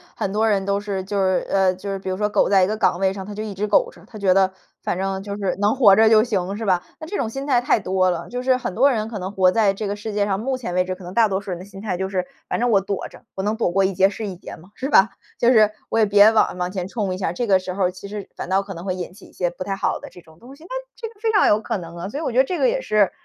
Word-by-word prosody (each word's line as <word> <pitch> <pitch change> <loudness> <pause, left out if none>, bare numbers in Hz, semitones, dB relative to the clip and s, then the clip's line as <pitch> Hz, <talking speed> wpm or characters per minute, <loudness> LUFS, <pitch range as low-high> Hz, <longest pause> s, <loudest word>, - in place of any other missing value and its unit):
很 195 - -2
多 220 +2 +2
人 195 -2 +1
都 200 0 0
是 200 -2 -4
就 200 +2 -4
是， 185 -1 +1
呃 190 -1 +3
就 200 +2 -6
是 195 - -3
比 190 - -6
如 185 - -2
说 210 +1 +1
苟 210 - +2
在 195 -2 +5
一 - - +3
个 215 - -1
岗 195 -4 +1
位 190 0 +2
上， 195 -1 -6
他 205 - -7
就 215 - -4
一 215 -2 -5
直 200 +2 -2
苟 - - +3
着， - - -18
他 220 - -11
觉 195 -3 +3
得 190 0 +3 0.3
反 - - -2
正 195 0 -2
就 200 0 -5
是 195 -3 -1
能 205 +4 +3
活 215 -7 +7
着 220 +1 +5
就 220 -1 +6
行， 200 -4 -2
是 225 - -4
吧？ 185 -3 +2 0.2
那 315 - -7
这 345 - -6
种 220 - -1
心 270 +4 -5
态 255 -4 +3
太 245 - +2
多 185 -1 +1
了， 175 -1 -3
就 250 0 -4
是 255 0 +2
很 190 -7 -4
多 265 +7 +4
人 220 -5 -1
可 225 -2 -6
能 185 +1 -4
活 185 -2 +3
在 210 -1 +3
这 195 +2 -5
个 200 - -2
世 210 +1 -6
界 205 0 +1
上， 195 -1 -1
目 260 +4 -2
前 230 -8 -5
为 180 0 +2
止， 185 0 -4
可 185 - -14
能 180 +1 -8
大 225 +1 +4
多 190 -2 -1
数 195 - -7
人 175 - -4
的 185 - -9
心 195 -1 -12
态 200 -3 -3
就 190 +2 -3
是， 185 -2 -1 0.2
反 - - -1
正 245 0 +1
我 200 -3 +4
躲 195 0 -4
着， - - -16
我 190 - -3
能 210 +2 0
躲 220 -6 0
过 195 +2 +2
一 190 - 0
劫 190 +1 +4
是 215 +2 -6
一 195 -3 -5
劫 175 - -10
嘛， 170 +4 -17
是 265 +5 -4
吧？ 220 -6 +6 0.3
就 240 - +4
是 215 -3 +6 0.2
我 225 - +1
也 220 - +5
别 205 +1 +7
往 220 -4 +2
往 180 0 -2
前 185 -1 -4
冲 200 -3 -2
一 185 - -5
下， 185 - -1
这 240 - -2
个 195 -4 +4
时 185 0 -6
候 185 -2 +1
其 185 +2 -10
实， 205 -1 -7
反 - - -6
倒 190 +1 +2
可 195 0 -8
能 170 -1 -8
会 185 -1 -2
引 180 -1 -6
起 190 - -15
一 - - -17
些 175 -1 -1
不 175 - -6
太 195 +1 -3
好 195 - -1
的 - - -10
这 180 - -15
种 160 -1 -20
东 255 +3 -13
西， 310 - -18
那 340 - -14 0.3
这 460 - -6
个 415 - -27
非 445 +1 +1
常 410 - +4
有 210 +1 +3
可 225 0 -2
能 170 -2 -9
啊， 175 +3 -5
所 280 - -5
以 - - -4
我 275 - -1
觉 245 - +2
得 - - +7
这 355 +6 -3
个 - - +3
也 - - 0
是 210 - +2
200 Hz, 375 characters per minute, -22 LUFS, 185-220 Hz, 0.3 s, 活